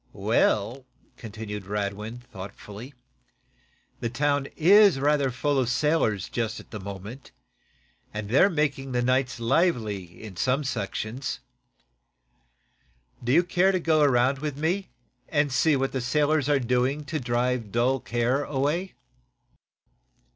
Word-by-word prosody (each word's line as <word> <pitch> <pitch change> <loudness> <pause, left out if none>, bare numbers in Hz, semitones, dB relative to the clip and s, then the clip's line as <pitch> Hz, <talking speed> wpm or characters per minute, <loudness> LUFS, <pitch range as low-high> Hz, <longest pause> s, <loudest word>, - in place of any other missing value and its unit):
"Well," 120 +6 +1 0.3
continued 105 -3 -7
Radwin, 105 +3 -4
thoughtfully, 110 +3 -10 1.0
"the 115 - -2
town 140 +2 0
is 195 -1 +6
rather 145 -1 +2
full 140 +3 0
of 125 -3 0
sailors, 120 - +1
just 115 -2 -3
at - - -15
present, 100 +4 -8 0.8
and 105 -1 -5
they're 135 - +5
making 140 -5 -1
the 120 0 +1
nights 125 0 +1
lively 115 - 0
in 100 -5 -9
some 130 +7 +1
sections. 120 +1 -3 1.8
Do 120 - 0
you 170 +6 +5
care 180 +2 +2
to 185 - 0
go 160 -2 +2
around 135 -1 +3
with 150 -1 -4
me, 180 +6 -1 0.4
and 145 -2 +1
see 145 +4 +3
what 135 0 0
the 130 - -2
sailors 145 +3 +1
are 145 - +4
doing 125 +3 0
to 155 +2 -3
drive 120 -3 -1
dull 125 +4 +2
care 120 +4 0
away?" 150 +7 -1
130 Hz, 125 wpm, -26 LUFS, 115-145 Hz, 1.8 s, is